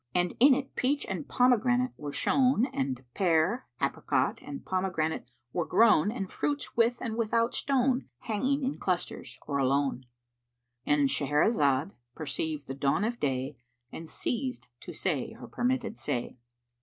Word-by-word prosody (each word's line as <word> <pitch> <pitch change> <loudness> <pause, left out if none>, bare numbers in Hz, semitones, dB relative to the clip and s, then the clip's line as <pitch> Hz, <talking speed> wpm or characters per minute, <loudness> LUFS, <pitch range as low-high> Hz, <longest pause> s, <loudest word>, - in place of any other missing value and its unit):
And 180 0 +2
in 265 +2 +7
it 270 0 -5
peach 280 +3 +1
and 290 - -5
pomegranate 250 0 +3
were 145 -1 -6
shown 255 - +3
and 130 -1 -2
pear, 180 +6 +2
apricot - - 0
and 280 - -8
pomegranate 170 -8 -1 0.2
were 170 -2 -1
grown 215 -5 +5
and 195 -5 -4
fruits 290 +8 -3
with 235 +1 +3
and 225 -2 -3
without 230 +1 +1
stone 265 -1 +1
hanging 260 +6 0
in 265 +2 -2
clusters 180 -2 -3
or 140 -2 -1
alone,—And 125 0 -2
Shahrazad 145 - +2 0.2
perceived 155 -1 -3
the 135 - -5
dawn 140 +8 +1
of 235 +2 -1
day 135 0 -1 0.3
and 165 0 -8
ceased 255 +1 -3
to - - -9
say - - -2
her - - -10
permitted 245 -2 -1
say. 120 - -3
185 Hz, 140 wpm, -29 LUFS, -, 0.3 s, in